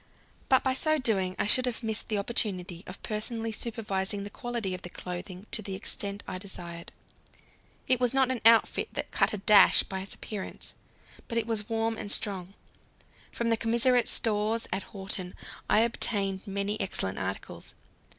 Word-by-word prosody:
But 260 - +5
by 260 - +2
so 310 +4 +2
doing 195 -8 +2
I - - 0
should 255 +5 +5
have 245 0 -3
missed 220 -1 0
the 215 - 0
opportunity 195 -4 -1
of 185 - -9
personally 225 +1 -2
supervising 205 -3 0
the 205 - -7
quality 235 -6 -3
of 185 - -5
the 180 - -7
clothing 180 +2 -7
to 220 - +1
the 195 -2 -5
extent 200 +1 -4
I 185 - -4
desired. 175 -3 -8 1.0
It 255 -2 +3
was 245 -2 +2
not 265 -1 +3
an 255 - -2
outfit 230 0 +5
that - - -3
cut - - +2
a 210 - -2
dash 205 +1 +6
by 190 - -5
its 195 - -4
appearance, 205 -3 -4 0.5
but 230 - -3
it 230 - +1
was 220 -2 -2
warm 225 0 0
and 205 - -1
strong. 195 -3 +3 0.8
From 235 -1 -1
the 230 - +3
commissariat 235 +2 +3
stores 220 +1 +1
at 190 - -3
Horten 190 -2 -5 0.3
I 215 - +5
obtained 200 -4 -1
many 200 +2 -2
excellent 100 - -1
articles. - - -5
210 Hz, 170 wpm, -29 LUFS, 190-230 Hz, 1.0 s, dash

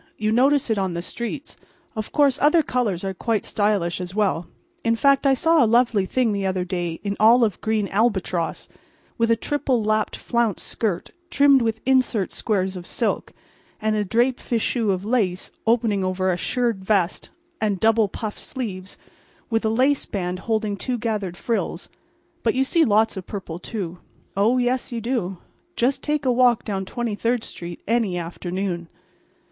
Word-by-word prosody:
You 215 0 0
notice 265 +2 +3
it 215 - +1
on 190 -3 -1
the 170 - -3
streets. 235 - -6 0.4
Of 215 -1 -4
course 285 -2 +3
other 305 +2 +5
colors 225 -10 -1
are 195 0 -2
quite 220 +3 -1
stylish 200 -4 0
as 180 +1 -6
well—in 230 - -2
fact, 275 +3 +3
I 270 - +5
saw 325 +1 +4
a - - +3
lovely 230 -5 +3
thing 250 0 +1
the 200 -1 -2
other 185 -1 -1
day 175 -2 -3
in 200 -1 -2
olive 225 -2 +5
green 220 -2 0
albatross, 190 -6 0 0.5
with 230 0 +2
a 230 - +5
triple 260 -1 0
lapped 215 0 0
flounce 235 -5 0
skirt 200 -6 -2 0.2
trimmed 280 -2 +5
with 225 -1 -1
insert 255 -6 +2
squares 190 -3 0
of 180 -1 -7
silk, - - -1 0.5
and 215 0 0
a 210 - +1
draped 240 +5 +1
fichu 230 -1 0
of 190 0 0
lace 205 -6 0 0.2
opening 225 -4 +2
over 185 0 0
a - - +1
shirred 235 0 -1
vest 190 -3 0 0.3
and 205 -3 0
double 220 0 +4
puff 210 +2 -6
sleeves 200 -8 -6 0.5
with 225 0 +1
a 220 - +2
lace 260 +5 +2
band 180 -2 -3
holding 215 -2 0
two 250 +4 -2
gathered 210 -6 -3
frills—but 230 +3 -4
you 265 - +3
see 325 +5 +3
lots 220 -3 +3
of 185 - -7
purple 185 -5 -6
too. 180 -4 -5 0.4
Oh, 215 +6 +3
yes, 250 +1 0
you 235 - -2
do; 225 -6 -2 0.4
just 255 +3 +1
take 295 -2 -1
a 255 - +4
walk 245 -2 +4
down 195 -2 -2
Twenty 235 +2 -3
third 230 +2 0
street 170 0 -8
any 220 -5 +1
afternoon. 175 +1 -4
220 Hz, 170 wpm, -23 LUFS, 190-245 Hz, 0.5 s, other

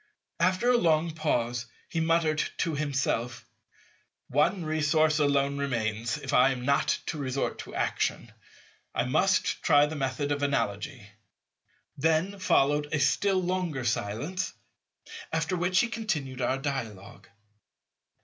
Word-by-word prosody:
After 185 +8 +3
a 245 - +4
long 165 -4 +2
pause 120 -6 -1 0.2
he 165 - -3
muttered 160 -1 +2 0.2
to 165 - 0
himself, 130 -5 -2 0.8
"One 155 +6 +1
resource 155 0 +2
alone 140 -1 +2
remains, 115 -3 -1
if - - -5
I 125 +2 +6
am 125 -2 -3
not 140 +1 +2
to 155 - -4
resort 135 -1 -2
to - - -8
action. - - -1 0.6
I - - +2
must 165 +5 +1
try 145 -1 +5
the 155 +1 -5
method 140 +1 -2
of 145 0 -1
Analogy." 125 -4 -2 0.9
Then 165 +7 +1
followed 145 -4 +2
a 155 - 0
still 185 +7 +2
longer 175 -8 -2
silence, 120 - -2 0.8
after 160 +2 0
which 180 +2 +2
he 240 - 0
continued 160 - -3
our 130 +2 +1
dialogue. 120 -7 -5
145 Hz, 130 wpm, -28 LUFS, 130-165 Hz, 0.9 s, I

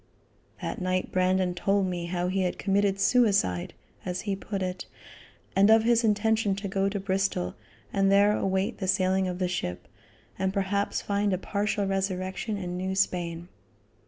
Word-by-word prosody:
That - - -3
same - - -5
night 185 0 -1
Brandon 185 0 +2
told 195 +2 +1
me 175 -2 -3
how 175 0 -1
he 190 +1 0
had 180 -1 -1
committed 200 0 +1
suicide, 200 - +2 0.3
as 180 0 -3
he 200 -2 -2
put 195 0 -4
it, 180 0 -4 0.7
and 200 +2 +5
of 220 0 +6
his 235 0 +3
intention 215 -1 +2
to 200 +1 -5
go 195 0 0
to 200 0 -3
Bristol 190 - -1 0.4
and 195 0 +3
there 205 +1 +5
await 190 0 -1
the 190 - -2
sailing 190 0 +2
of 180 -1 -3
the 185 -1 0
ship, 90 - -4 0.5
and 190 0 +1
perhaps 200 0 -1
find 200 -1 0
a - - +1
partial 205 +1 -1
resurrection 195 +2 -2
in 180 -2 -4
New 190 +1 -2
Spain. 175 -3 -1
195 Hz, 170 wpm, -27 LUFS, 185-200 Hz, 0.7 s, of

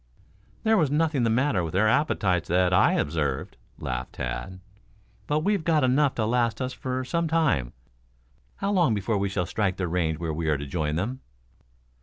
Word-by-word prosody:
"There 220 0 +4
was 155 -7 +2
nothing 150 -1 +1
the 115 - +2
matter 115 -5 +1
with 80 - -5
their 100 +4 +3
appetites 100 - +1
that 90 +1 +2
I - - +5
observed," 75 -3 -1 0.2
laughed 60 -1 -4
Tad. - - -5 0.7
"But 150 +1 +1
we've 200 0 +1
got 155 -3 +2
enough 135 +2 +3
to 110 - 0
last 115 0 +1
us 130 -1 -3
for 130 0 -3
some 170 +5 -1
time. 150 - +1 0.8
How 200 +1 -2
long 175 - +3
before 105 +1 -1
we 100 0 0
shall 95 -2 -1
strike 95 +1 -1
the 95 - -1
range 80 -2 0
where 80 -1 -3
we 80 +1 -3
are 75 - +2
to 70 - -6
join 75 +1 -2
them?" 120 +10 -3
110 Hz, 185 wpm, -26 LUFS, -, 0.8 s, I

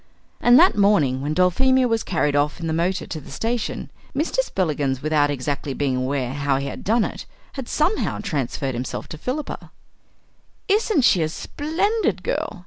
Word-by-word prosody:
And 240 +1 +6
that 360 +5 +6
morning 170 -11 +3
when 150 +2 -2
Dulphemia 255 +9 +3
was 225 -2 +1
carried 150 -5 0
off 145 +3 +1
in 165 - -5
the 160 - -1
motor 180 +4 0
to 155 - -6
the - - -13
station, 225 - -3 0.2
Mr. 310 - -1
Spillikins, 150 - -1
without 150 -1 +2
exactly 140 0 -3
being 140 -3 0
aware 130 0 -1
how 140 -1 0
he 140 - -3
had - - -6
done 225 +2 +2
it, - - -7 0.3
had 265 -4 -6
somehow 345 +8 0
transferred 140 - -2
himself 125 +2 -4
to 155 - -8
Philippa. 280 - -4 1.0
"Isn't 415 -5 +2
she 190 -7 +4
a 155 - +1
splendid 345 - -1
girl!" 350 - -2
170 Hz, 170 wpm, -22 LUFS, -, 1.0 s, And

